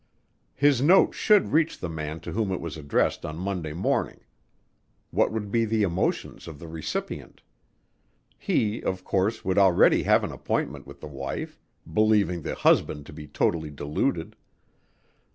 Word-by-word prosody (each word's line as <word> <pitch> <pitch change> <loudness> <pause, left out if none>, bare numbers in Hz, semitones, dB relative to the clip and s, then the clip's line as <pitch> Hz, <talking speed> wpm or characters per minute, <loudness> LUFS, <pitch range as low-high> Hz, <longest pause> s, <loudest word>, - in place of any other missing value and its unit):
His 145 -3 +3
note 175 +7 +5
should 210 -3 +3
reach 160 +2 +2
the 90 - -4
man 80 -1 -5
to - - -7
whom 105 -3 -1
it 95 - -2
was 85 -2 -6
addressed 70 -3 0
on 75 - -5
Monday 90 -4 -3
morning. 90 +4 -1 0.9
What - - +2
would 105 -2 -4
be 115 +1 +2
the 110 -1 +1
emotions 90 -2 -2
of 80 -3 -8
the 85 - -10
recipient? 80 -1 -5 1.0
He, 110 +1 0
of 95 0 -3
course, 100 +4 -1
would 95 +1 +2
already 95 -3 +5
have - - +3
an - - -3
appointment - - -3
with 70 0 -13
the - - -7
wife, 70 -1 -6 0.3
believing 100 -1 +2
the - - -4
husband 75 -1 +2
to - - -11
be 75 0 -9
totally 80 +2 0
deluded. 75 +1 -2
90 Hz, 155 wpm, -26 LUFS, 75-110 Hz, 1.0 s, note